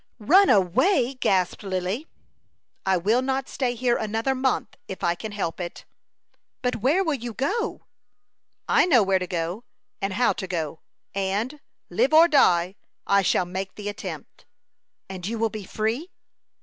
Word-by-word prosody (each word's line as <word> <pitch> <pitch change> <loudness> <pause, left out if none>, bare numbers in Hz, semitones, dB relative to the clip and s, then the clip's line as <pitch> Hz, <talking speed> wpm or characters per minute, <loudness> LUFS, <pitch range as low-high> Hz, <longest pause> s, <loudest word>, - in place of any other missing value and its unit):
"Run 360 - +5
away!" 245 - +3
gasped 190 -8 0
Lily. 190 - -3 0.8
"I 190 -1 +4
will 215 +8 +2
not 265 0 -1
stay 250 -2 -2
here 240 0 +1
another 225 +4 -1
month 260 0 -1
if 190 - -7
I 170 - +3
can 215 +5 -7
help 195 -5 -3
it." 175 -1 -6 0.8
"But 250 -1 0
where 280 - +2
will 320 -4 0
you 240 -4 -5
go?" 430 - -2 0.8
"I - - +4
know 250 - +5
where 190 -1 +2
to 180 - -4
go, 175 +5 -3 0.4
and 195 0 -1
how 245 +4 +2
to 190 - -6
go; 160 -4 -3 0.3
and, 200 +9 -2 0.3
live 250 - +2
or 330 +2 +8
die, 185 - +3 0.3
I 200 0 +4
shall 180 -1 +2
make 190 +2 -5
the 205 -1 -5
attempt." 205 - -8 0.6
"And 185 -1 -6
you 230 +2 -3
will 225 -1 0
be 215 -3 -7
free?" 225 - -2
215 Hz, 160 wpm, -25 LUFS, 190-260 Hz, 0.8 s, or